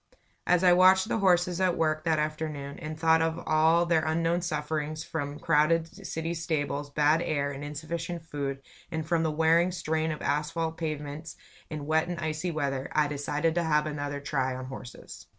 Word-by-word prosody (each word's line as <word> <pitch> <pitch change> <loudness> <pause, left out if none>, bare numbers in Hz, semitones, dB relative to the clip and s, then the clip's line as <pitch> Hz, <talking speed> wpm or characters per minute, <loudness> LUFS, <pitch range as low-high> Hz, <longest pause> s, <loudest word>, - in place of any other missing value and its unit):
As 180 0 +4
I 180 -1 +7
watched 185 +3 +5
the - - 0
horses 180 -2 +3
at 185 -2 +2
work 155 -1 0
that 160 -2 +2
afternoon, 150 -2 -3
and 155 -1 -6
thought 160 0 +4
of 165 0 0
all 160 +2 +4
their 165 -2 +2
unknown 165 +2 +1
sufferings 155 -1 -2
from 145 -3 -4
crowded 165 +1 +3 0.2
city 165 +1 -3
stables, 150 -3 -2
bad 150 +3 +3
air 145 -4 -1
and 140 +1 -7
insufficient 165 +3 -5
food, 140 -3 -4 0.3
and 160 -2 -3
from 170 -1 +2
the 160 - +1
wearing 165 +3 +3
strain 160 -2 -1
of 155 - -6
asphalt 160 +2 -1
pavements 155 0 -5 0.3
in 150 -2 -5
wet 160 +2 +2
and 175 -1 -4
icy 155 +1 -2
weather, 140 -4 -2
I 150 -1 +3
decided 145 +3 -1
to 175 +1 +1
have 150 -2 +2
another 145 -1 -3
try 135 -2 -1
on 130 0 -6
horses. 130 -1 -10
155 Hz, 180 wpm, -28 LUFS, 150-165 Hz, 0.3 s, I